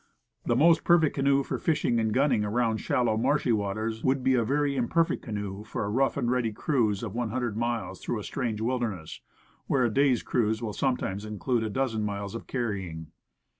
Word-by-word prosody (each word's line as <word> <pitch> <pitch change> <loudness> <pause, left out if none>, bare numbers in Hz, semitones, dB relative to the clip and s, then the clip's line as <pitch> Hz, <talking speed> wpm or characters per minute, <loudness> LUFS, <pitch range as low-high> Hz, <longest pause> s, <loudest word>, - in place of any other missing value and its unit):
And - - -7
the 120 - +3
most 165 +5 +5
perfect 165 -3 +4
canoe 140 0 +2
for - - -3
fishing 125 -7 +1
and 110 -1 0
gunning 130 -2 +2
around 110 +1 +1
shallow, 115 -1 +1
marshy 130 +2 +1
waters, 110 +1 -1
would 130 0 +1
be 130 0 +3
a 120 -2 +3
very 140 +3 0
imperfect 160 +7 +1
canoe 105 -3 -5
for 110 - -4
a - - -2
rough 135 +5 +1
and 120 -3 0
ready 125 -3 +1
cruise 110 -3 0
of 105 -4 -4
one 120 -1 -2
hundred 120 -2 -2
miles 115 0 -2
through 120 - -2
a 105 - -5
strange 115 -5 -3
wilderness, 115 -9 -3 0.5
where 130 -3 +2
a 115 - 0
day's 135 -2 +3
cruise 110 -2 0
will 110 -3 -4
sometimes 115 -7 -1
include 110 +3 -1
a 110 - -2
dozen 115 -2 -1
miles 100 -1 -3
of 115 - -7
car 120 -3 -1
rying. 85 -6 -6
115 Hz, 205 wpm, -27 LUFS, 105-130 Hz, 0.5 s, most